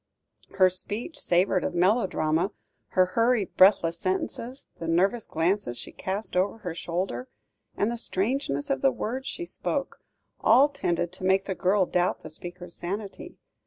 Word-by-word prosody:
Her 190 -1 +6
speech 205 - -2
savoured 180 +1 +2
of - - -2
melodrama, 180 -2 +2 0.4
her 185 - +7
hurried, 230 -3 +2
breathless 170 -3 +5
sentences, 230 +7 -3
the 165 - -5
nervous 195 +8 +1
glances 165 -5 0
she - - -8
cast 195 +2 -4
over 190 +4 +1
her 180 -6 -5
shoulder, 170 -7 -3 0.5
and 210 +3 +1
the 235 - -4
strangeness 200 - -1
of 135 - 0
the 135 - +4
words 255 - -4
she 345 - -4
spoke, - - -3 0.4
all 260 +6 +6
tended 175 -11 -1
to 185 - -11
make 190 +1 +3
the 190 - -2
girl 190 +1 +2
doubt 180 0 0
the 155 - -9
speaker's 175 +2 -8
sanity. 195 +3 -6
185 Hz, 155 wpm, -27 LUFS, 175-215 Hz, 0.5 s, her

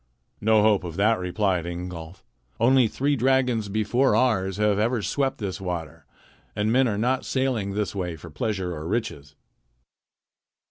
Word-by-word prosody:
"No 110 0 +4
hope 105 -3 +3
of 85 -2 -6
that," 110 +3 +2
replied 90 -1 -1
Ingolf. 85 0 -7 0.4
"Only 125 +1 +5
three 140 +6 0
dragons 125 -4 +1
before 110 +4 +2
ours 105 -6 +1
have 105 -1 +2
ever 115 0 0
swept 135 +3 -1
this 100 -2 -5
water, 80 -4 -5 0.5
and 105 +1 0
men 130 +2 +4
are 105 -3 -1
not 125 +4 0
sailing 120 -7 -1
this 105 -2 -1
way 90 -4 -3
for 80 +1 -12
pleasure 95 +2 -2
or 80 0 -6
riches." 80 -9 -3
105 Hz, 150 wpm, -25 LUFS, 90-120 Hz, 0.5 s, Only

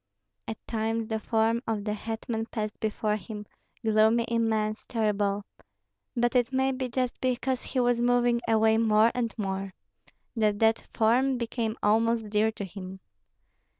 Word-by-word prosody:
At 220 - -4
times 225 0 -2
the 220 -1 -1
form 225 +1 +1
of 220 -2 -1
the 210 0 -1
hetman 225 +1 -4
passed 215 -3 -4
before 215 0 -1
him, 210 -1 -8 0.4
gloomy, 220 +2 +4
immense, 220 -2 0
terrible. 205 -3 0 0.7
But 240 +1 +1
it 245 0 +3
may 265 0 +2
be 255 -1 -3
just 250 0 -2
because 255 0 0
he 260 - -3
was 245 -1 +2
moving 245 -1 +3
away 220 0 +4
more 220 0 +4
and 235 -2 -1
more, 195 -2 -3 0.6
that 215 -2 +2
that 225 +1 +2
form 250 +4 +3
became 230 -1 -2
almost 225 0 +2
dear 215 +1 +3
to 205 -2 -6
him. 190 0 -8
225 Hz, 150 wpm, -28 LUFS, 215-235 Hz, 0.7 s, gloomy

